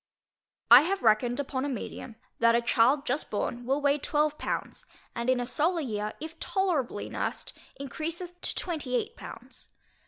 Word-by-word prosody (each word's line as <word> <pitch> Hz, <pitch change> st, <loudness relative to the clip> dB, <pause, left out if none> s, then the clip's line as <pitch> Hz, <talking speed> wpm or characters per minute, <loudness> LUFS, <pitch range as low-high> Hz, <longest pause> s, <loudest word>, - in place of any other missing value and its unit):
I -, -, +12 dB
have 385 Hz, +6 st, -1 dB
reckoned 235 Hz, +3 st, +3 dB
upon 265 Hz, -2 st, -2 dB
a 285 Hz, -, -1 dB
medium, 240 Hz, -2 st, -6 dB, 0.2 s
that 230 Hz, 0 st, +5 dB
a 235 Hz, -, +3 dB
child 255 Hz, +5 st, +3 dB
just 280 Hz, +5 st, -1 dB
born 240 Hz, +3 st, -3 dB
will 275 Hz, +3 st, +1 dB
weigh 285 Hz, +1 st, +3 dB
12 300 Hz, +1 st, 0 dB
pounds, -, -, -4 dB, 0.3 s
and 235 Hz, +2 st, -2 dB
in 255 Hz, -1 st, +3 dB
a 245 Hz, -, -1 dB
solar 325 Hz, +8 st, 0 dB
year, 215 Hz, -5 st, -3 dB
if 320 Hz, +1 st, -8 dB
tolerably 360 Hz, -, -1 dB
nursed, -, -, -4 dB, 0.3 s
encreaseth 335 Hz, +6 st, -5 dB
to -, -, 0 dB
28 330 Hz, -, -2 dB
pounds. -, -, -11 dB
280 Hz, 160 wpm, -28 LUFS, 240-320 Hz, 0.3 s, I